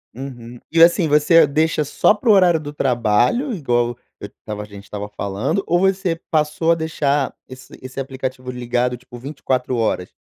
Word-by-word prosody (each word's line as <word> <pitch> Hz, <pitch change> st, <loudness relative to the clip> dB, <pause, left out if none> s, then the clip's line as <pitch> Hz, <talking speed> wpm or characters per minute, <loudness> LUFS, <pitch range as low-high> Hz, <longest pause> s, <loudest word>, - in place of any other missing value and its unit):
Uhum. 120 Hz, -2 st, -9 dB
E 165 Hz, -, +3 dB
assim, 170 Hz, 0 st, +5 dB
você 150 Hz, +3 st, +5 dB
deixa 155 Hz, +2 st, +1 dB
só 150 Hz, -, +3 dB
para 220 Hz, +3 st, -2 dB
o -, -, +9 dB
horário 180 Hz, -4 st, +4 dB
do 145 Hz, -1 st, -8 dB
trabalho? 125 Hz, -, +1 dB
Igual 120 Hz, -, 0 dB, 0.2 s
eu -, -, -7 dB
estava 105 Hz, -1 st, -8 dB
a -, -, -8 dB
gente 100 Hz, -1 st, -12 dB
estava 105 Hz, 0 st, -6 dB
falando? 105 Hz, -, -2 dB
Ou 175 Hz, -, +2 dB
você 190 Hz, -2 st, +1 dB, 0.2 s
passou 155 Hz, +1 st, +1 dB
a -, -, +4 dB
deixar 145 Hz, -4 st, -1 dB
esse 130 Hz, 0 st, -13 dB
esse 130 Hz, +1 st, -8 dB
aplicativo 130 Hz, -1 st, -5 dB
ligado, 125 Hz, 0 st, -1 dB
tipo 125 Hz, 0 st, -13 dB
24 130 Hz, -2 st, -2 dB
horas? 110 Hz, -6 st, -1 dB
135 Hz, 175 wpm, -20 LUFS, 120-160 Hz, 0.2 s, o